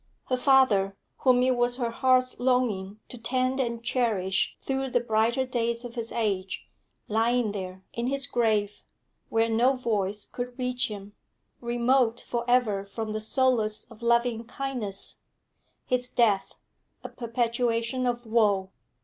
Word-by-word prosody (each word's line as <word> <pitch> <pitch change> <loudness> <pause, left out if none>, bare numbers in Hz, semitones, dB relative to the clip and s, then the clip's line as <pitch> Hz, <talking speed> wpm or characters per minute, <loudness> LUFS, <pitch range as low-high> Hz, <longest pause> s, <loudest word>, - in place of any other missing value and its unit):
Her 255 - +2
father, 240 -8 +4 0.2
whom 250 -1 +4
it 255 0 +3
was 240 0 +1
her 240 -2 -2
heart's 255 +1 +2
longing 225 -6 0
to 245 - -10
tend 255 +3 0
and 235 -3 -2
cherish 220 -7 0
through 270 0 -2
the 245 - +2
brighter 235 +3 +1
days 235 -1 -1
of 240 - -7
his 230 -2 -4
age 200 -5 -2 0.4
lying 225 +1 +2
there 190 -2 -6
in 235 +1 -2
his 275 +1 +1
grave, 215 -5 0 0.5
where 225 0 +2
no 240 +4 +3
voice 210 -5 -1
could 245 0 -6
reach 250 -1 0
him, 205 -1 -8 0.5
remote 240 0 +2
for 235 -1 -1
ever 225 -6 +3
from 215 +2 -5
the 215 - -3
solace 220 -2 +1
of 225 0 -14
loving 235 0 +2
kindness, 240 -6 -4 0.7
his 250 0 0
death 210 -5 +2 0.5
a - - -4
perpetuation 235 +1 -1
of 240 0 -2
woe. 205 -4 +2
235 Hz, 140 wpm, -27 LUFS, 215-250 Hz, 0.7 s, father